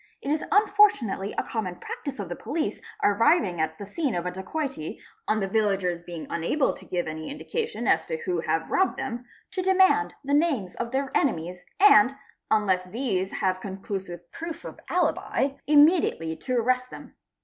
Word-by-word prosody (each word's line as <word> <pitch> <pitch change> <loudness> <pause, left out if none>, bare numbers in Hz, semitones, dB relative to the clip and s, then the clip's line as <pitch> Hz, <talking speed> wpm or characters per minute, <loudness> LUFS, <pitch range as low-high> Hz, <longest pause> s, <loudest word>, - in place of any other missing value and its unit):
It 280 - -3
is 305 - 0
unfortunately 395 - +3
a - - +1
common 200 -6 -3
practice 275 +8 -6
of 200 - -4
the 175 - -5
police 315 0 -3 0.2
arriving 205 - +3
ii 160 - +3
the 200 - -7
scene 265 +6 -2
of 175 0 -2
a 180 - -1
dacoity, 190 - -4 0.3
on 215 - +2
the 195 - 0
villagers 195 -4 0
being 170 -2 -7
unable 170 - 0
to - - -13
give 175 -1 -2
any 155 - -5
ndication 455 +10 -3
as - - +3
tb 475 -1 -4
who 365 -4 -1
have - - -1
robbed 380 - +2
them, 250 -2 -4 0.3
to 370 - -2
demand 375 - +3
the 280 +1 -2
names 285 - +1
of 235 - -3
their: 270 +2 -1
nemies 180 - 0 0.2
and, 275 - +7 0.3
unless 195 -4 +2
these 195 -2 -2
have 185 -1 -1
conclusive 190 -2 -5
proof 330 0 -7
of - - -8
alibi, 315 -5 +1 0.2
immediately 295 - +4
to 250 +11 -3
4 235 - +2
rrest 255 0 +1
them. - - -11
225 Hz, 175 wpm, -26 LUFS, 185-300 Hz, 0.3 s, and